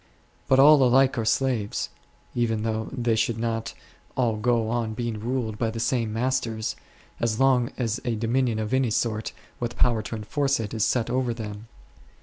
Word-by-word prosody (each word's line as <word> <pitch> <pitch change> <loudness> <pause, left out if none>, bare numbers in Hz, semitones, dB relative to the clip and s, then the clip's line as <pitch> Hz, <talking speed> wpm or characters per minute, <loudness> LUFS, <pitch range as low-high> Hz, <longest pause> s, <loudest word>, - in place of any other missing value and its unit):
But 135 -1 +4
all 145 +1 +8
alike 130 +2 +4
are 115 - -1
slaves, 115 -3 0 0.4
even 115 -3 0
though 110 0 -2
they 120 -4 0
should 110 +1 0
not 115 -1 -2 0.4
all 120 -4 +2
go 115 +1 +1
on 115 -1 -1
being 115 -2 -3
ruled 115 -2 -2
by 115 - +1
the 115 +1 -5
same 120 -2 0
masters, 115 -2 -1 0.4
as 115 -2 0
long 130 -3 +3
as 115 -2 -1
a 120 -3 -1
dominion 115 +1 0
of 110 +1 -3
any 130 -2 +2
sort, 110 0 -1 0.3
with 120 0 -4
power 120 -3 +3
to 110 - -5
enforce 135 +6 0
it, 110 -1 -4
is 110 -2 0
set 115 0 +1
over 125 -2 0
them. 105 -1 -7
115 Hz, 175 wpm, -25 LUFS, 110-125 Hz, 0.4 s, all